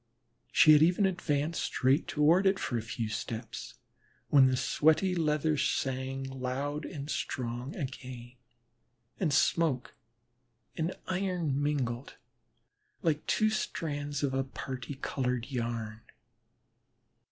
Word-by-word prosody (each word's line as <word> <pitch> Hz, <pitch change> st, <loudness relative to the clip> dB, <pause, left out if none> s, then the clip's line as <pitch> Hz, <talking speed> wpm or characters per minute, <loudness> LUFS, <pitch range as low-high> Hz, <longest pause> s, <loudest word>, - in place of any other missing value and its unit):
She 155 Hz, -, +7 dB
had 150 Hz, -, +6 dB
even 180 Hz, +5 st, +4 dB
advanced 165 Hz, -4 st, 0 dB
straight 135 Hz, +5 st, +2 dB
toward 165 Hz, +6 st, +4 dB
it 190 Hz, 0 st, +3 dB
for 125 Hz, -, -3 dB
a 115 Hz, -, 0 dB
few 115 Hz, 0 st, -4 dB
steps 115 Hz, +1 st, -5 dB, 0.5 s
when 135 Hz, -3 st, +7 dB
the 130 Hz, 0 st, +1 dB
sweaty 160 Hz, +8 st, +3 dB
leather 155 Hz, -2 st, +1 dB
sang 135 Hz, 0 st, -1 dB
loud 135 Hz, +3 st, -3 dB
and 140 Hz, -1 st, -6 dB
strong 125 Hz, -2 st, -3 dB
again, 125 Hz, -3 st, -6 dB, 0.9 s
and 175 Hz, -6 st, +1 dB
smoke 140 Hz, -3 st, +2 dB, 0.8 s
and 165 Hz, +3 st, -2 dB
iron 180 Hz, -7 st, -1 dB
mingled 135 Hz, -4 st, -2 dB, 0.9 s
like 155 Hz, -2 st, +1 dB
two 215 Hz, 0 st, +3 dB
strands 145 Hz, -8 st, -3 dB
of 135 Hz, -2 st, +1 dB
a 135 Hz, 0 st, +1 dB
parti 130 Hz, 0 st, -6 dB
colored 125 Hz, -2 st, -2 dB
yarn. 115 Hz, -3 st, -3 dB
140 Hz, 115 wpm, -30 LUFS, 125-155 Hz, 0.9 s, She